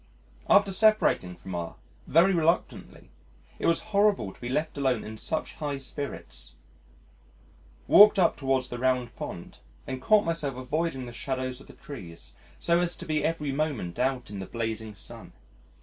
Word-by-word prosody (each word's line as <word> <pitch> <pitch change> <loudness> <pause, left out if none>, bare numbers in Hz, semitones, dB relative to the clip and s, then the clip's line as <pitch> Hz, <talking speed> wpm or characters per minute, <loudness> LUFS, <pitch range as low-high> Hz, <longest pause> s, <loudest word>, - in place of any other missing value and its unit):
After 195 - +5
separating 205 - +3
from 95 +1 -9
R 85 -1 -4 0.3
very 180 +5 +5
reluctantly 165 -1 -1 0.5
it - - 0
was 165 - +3
horrible 200 - +3
to - - -22
be 120 - -4
left 150 +4 -1
alone 130 -5 0
in 110 - -7
such 160 +8 -3
high 145 -3 -3
spirits, 130 - -7 1.3
walked 210 +1 +8
up 175 -3 +4
towards 135 -2 0
the 120 - -5
Round 125 -1 0
Pond, 85 - -8 0.3
and 130 -1 -5
caught 215 +5 +4
myself 165 -5 -2
avoiding 135 +1 -2
the 120 - -9
shadows 130 +1 -4
of - - -16
the - - -13
trees 90 - -10 0.2
so 170 0 +2
as 175 -1 -1
to - - -8
be 155 -1 0
every 155 -3 -1
moment 135 - -2
out 125 -3 -1
in 100 - -6
the 95 - -6
blazing 110 -2 -4
sun. - - -10
135 Hz, 165 wpm, -27 LUFS, 120-165 Hz, 1.3 s, walked